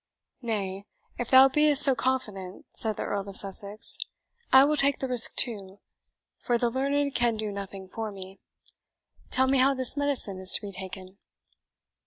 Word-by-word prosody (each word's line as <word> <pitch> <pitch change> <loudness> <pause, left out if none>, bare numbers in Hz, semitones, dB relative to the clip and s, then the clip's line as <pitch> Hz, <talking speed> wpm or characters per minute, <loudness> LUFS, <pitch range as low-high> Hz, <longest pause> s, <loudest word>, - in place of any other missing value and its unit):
"Nay, 200 -4 -5 0.3
if 245 - -4
thou 260 0 +7
be'st 295 +1 +4
so 275 - +5
confident," 215 -7 -4
said 220 -2 -3
the - - -4
Earl 200 -1 -5
of 195 - -7
Sussex, 200 +2 -1 0.5
"I 265 0 +7
will 300 +2 +1
take 280 -1 +2
the 265 - -5
risk 250 -3 +6
too, 200 -5 0 0.6
for 240 -2 -1
the 235 0 -1
learned 280 +2 -2
can 240 -2 -1
do 215 -1 -4
nothing 195 -1 -9
for 220 +3 -7
me. 190 -1 -12 0.9
Tell 260 - +1
me 265 0 +1
how 270 +2 +2
this 260 0 +3
medicine 280 -9 -2
is 185 0 +2
to - - 0
be 205 -2 -8
taken." 190 0 -9
225 Hz, 170 wpm, -26 LUFS, 195-265 Hz, 0.9 s, thou